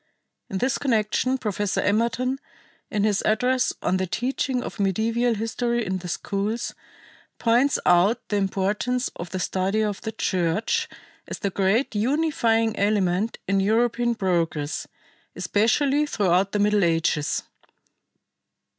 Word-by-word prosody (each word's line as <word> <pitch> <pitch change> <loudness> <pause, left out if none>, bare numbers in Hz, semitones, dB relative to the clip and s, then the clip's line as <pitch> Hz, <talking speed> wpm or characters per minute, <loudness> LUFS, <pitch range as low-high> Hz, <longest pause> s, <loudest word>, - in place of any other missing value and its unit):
In 195 - -3
this 255 +7 0
connection 255 +1 +1
Professor 205 -4 -1
Emerton, 235 +5 0 0.5
in 210 -1 0
his 205 -2 +2
address 250 +4 +2
on 185 - +1
the 185 0 -1
"Teaching 250 +4 -1
of - - -7
Medieval 225 +4 +1
History 235 +2 -1
in 185 0 -2
the 180 - -8
Schools," 205 +6 -2 0.6
points 245 +4 +3
out 185 +7 +3
the 205 - +1
importance 205 +6 -1
of 170 0 -7
the 185 - -4
study 190 +3 0
of 205 -2 -2
the 220 - -4
Church 185 -1 0 0.4
as - - -5
the 200 - -2
great 200 +8 +1
unifying 230 -2 +1
element 200 0 +1
in 195 0 +2
European 235 +3 +1
progress, 165 -6 -1 0.5
especially 280 +7 +2
throughout 195 -5 +1
the - - 0
Middle 205 0 +3
Ages. 165 -3 +1
210 Hz, 130 wpm, -24 LUFS, 190-240 Hz, 0.6 s, points